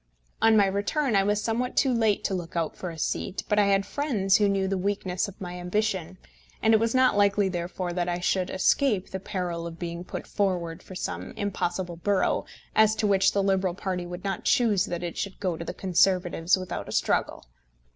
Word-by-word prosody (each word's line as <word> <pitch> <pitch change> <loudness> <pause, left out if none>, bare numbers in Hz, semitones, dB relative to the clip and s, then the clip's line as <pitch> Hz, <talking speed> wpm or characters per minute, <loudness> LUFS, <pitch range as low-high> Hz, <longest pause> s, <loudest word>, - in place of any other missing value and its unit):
On 225 -1 +5
my 205 - +6
return 205 +7 0
I 195 - +5
was 205 +1 0
somewhat 240 +2 -1
too 265 -2 +3
late 220 -3 +2
to - - -1
look 175 -3 -5
out 165 -2 -1
for 180 - -5
a 165 - -8
seat, 180 - -2
but 210 - +2
I 205 - +4
had 195 0 +2
friends 215 -10 +1
who 205 -1 +3
knew 195 -1 +1
the 195 - 0
weakness 190 -1 -1
of 200 - -11
my 180 -1 -6
ambition; 185 -1 -2 0.4
and 220 - +3
it 220 - +6
was 230 +2 0
not 255 -3 +4
likely, 200 -1 +3
therefore, 175 0 -3
that 175 0 -1
I 175 0 -1
should 180 +1 0
escape 205 +1 +1
the 190 - -3
peril 180 -4 -4
of 165 -1 -9
being 170 0 -5
put - - -6
forward 180 -5 -1
for 185 - -11
some - - -5
impossible 180 -4 -3
borough 200 +3 0 0.3
as 215 0 +5
to 215 - -1
which 195 -2 +3
the 200 - +1
Liberal 190 -2 +1
party 185 -2 -3
would 175 +1 -7
not 195 -2 -3
choose 210 -5 +3
that 175 0 -4
it 175 - -4
should 200 -1 -4
go 185 -4 -1
to 170 - -6
the - - -4
Conservatives 180 -1 +2
without 185 -1 -5
a - - -6
struggle. - - 0
190 Hz, 215 wpm, -26 LUFS, 180-205 Hz, 0.4 s, my